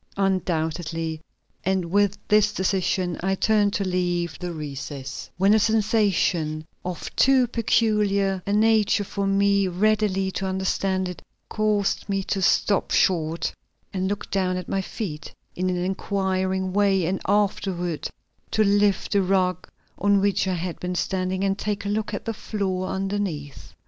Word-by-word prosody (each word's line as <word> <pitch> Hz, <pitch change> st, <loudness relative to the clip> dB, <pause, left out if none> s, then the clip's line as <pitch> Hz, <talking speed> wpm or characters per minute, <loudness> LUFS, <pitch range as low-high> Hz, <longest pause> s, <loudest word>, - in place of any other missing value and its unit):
Undoubtedly; 165 Hz, -4 st, -1 dB, 0.4 s
and 190 Hz, -1 st, +1 dB
with 205 Hz, 0 st, +2 dB
this 210 Hz, 0 st, +4 dB
decision 185 Hz, -2 st, 0 dB
I 190 Hz, +1 st, +1 dB
turned 205 Hz, 0 st, +2 dB
to 195 Hz, -, -1 dB
leave 175 Hz, -2 st, -1 dB
the 180 Hz, -1 st, -4 dB
recess, 140 Hz, -3 st, -6 dB
when 195 Hz, +3 st, +4 dB
a 220 Hz, -, +5 dB
sensation, 200 Hz, -8 st, +1 dB, 0.2 s
of 180 Hz, -1 st, -6 dB
too 265 Hz, -1 st, +5 dB
peculiar 210 Hz, -5 st, +1 dB
a -, -, 0 dB
nature 215 Hz, -1 st, +3 dB
for 200 Hz, 0 st, -3 dB
me 200 Hz, 0 st, +3 dB
readily 195 Hz, 0 st, +1 dB
to 190 Hz, 0 st, -3 dB
understand 190 Hz, 0 st, 0 dB
it, 180 Hz, -, -7 dB, 0.3 s
caused 210 Hz, -2 st, 0 dB
me 195 Hz, -1 st, 0 dB
to 195 Hz, 0 st, -2 dB
stop 200 Hz, +2 st, +2 dB
short, 165 Hz, -2 st, +1 dB, 0.4 s
and 190 Hz, 0 st, -1 dB
look 205 Hz, +1 st, -4 dB
down 185 Hz, -2 st, 0 dB
at 180 Hz, -, -5 dB
my 195 Hz, -, 0 dB
feet 165 Hz, -7 st, -6 dB, 0.2 s
in 185 Hz, +1 st, 0 dB
an 180 Hz, -, -1 dB
inquiring 190 Hz, 0 st, -1 dB
way 195 Hz, -3 st, +3 dB
and 185 Hz, +3 st, -1 dB
afterward 190 Hz, -4 st, 0 dB, 0.4 s
to 220 Hz, -, +2 dB
lift 205 Hz, -1 st, +2 dB
the 200 Hz, -, +3 dB
rug 185 Hz, -1 st, 0 dB, 0.3 s
on 200 Hz, 0 st, +3 dB
which 200 Hz, -1 st, +1 dB
I 185 Hz, -, 0 dB
had 175 Hz, 0 st, -4 dB
been 180 Hz, 0 st, -3 dB
standing 185 Hz, +1 st, -1 dB
and 195 Hz, 0 st, 0 dB
take 205 Hz, -1 st, -2 dB
a -, -, -1 dB
look 215 Hz, +1 st, -1 dB
at -, -, -5 dB
the 225 Hz, -, -2 dB
floor 190 Hz, -4 st, -2 dB
underneath. 190 Hz, -8 st, -4 dB
190 Hz, 150 wpm, -24 LUFS, 180-205 Hz, 0.4 s, a